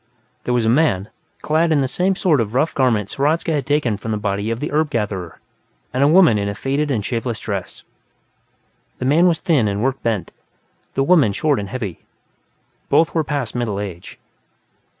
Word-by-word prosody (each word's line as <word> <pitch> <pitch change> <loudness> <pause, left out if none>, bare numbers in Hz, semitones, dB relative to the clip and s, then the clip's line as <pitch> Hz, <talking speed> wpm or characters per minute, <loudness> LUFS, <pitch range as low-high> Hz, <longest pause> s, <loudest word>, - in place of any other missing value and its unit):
There 125 - 0
was 120 -2 +1
a - - +1
man, 115 -7 +2 0.3
clad 160 +2 +2
in 150 -3 +3
the 135 - +1
same 185 +8 0
sort 165 - +2
of 110 +1 -4
rough 155 +5 +1
garments 115 -7 0
Hradzka 155 +4 +1
had 145 -3 -2
taken 145 -8 +1
from 110 - -7
the 110 - 0
body 100 +1 -2
of 115 0 -2
the 150 - -4
herb 155 +1 +1
gatherer, 100 - -3 0.5
and 130 +2 +2
a - - +5
woman 155 - +5
in 100 0 -1
a 100 - -4
faded 140 +6 -1
and 110 -7 -1
shapeless 115 -1 -2
dress. 100 -6 -5 1.1
The - - -4
man 160 +7 +4
was 170 -2 +2
thin 145 -11 +2
and 100 +1 -2
work 135 +1 -1
bent; 110 -5 -2 0.6
the 135 - +2
woman 140 - +4
short 145 +3 +1
and 100 -1 -5
heavy. 110 -8 -5 0.9
Both 165 - +3
were 160 - +1
past 140 -5 -3
middle 115 -5 -2
age. 95 -4 -7
125 Hz, 190 wpm, -20 LUFS, 105-150 Hz, 1.1 s, a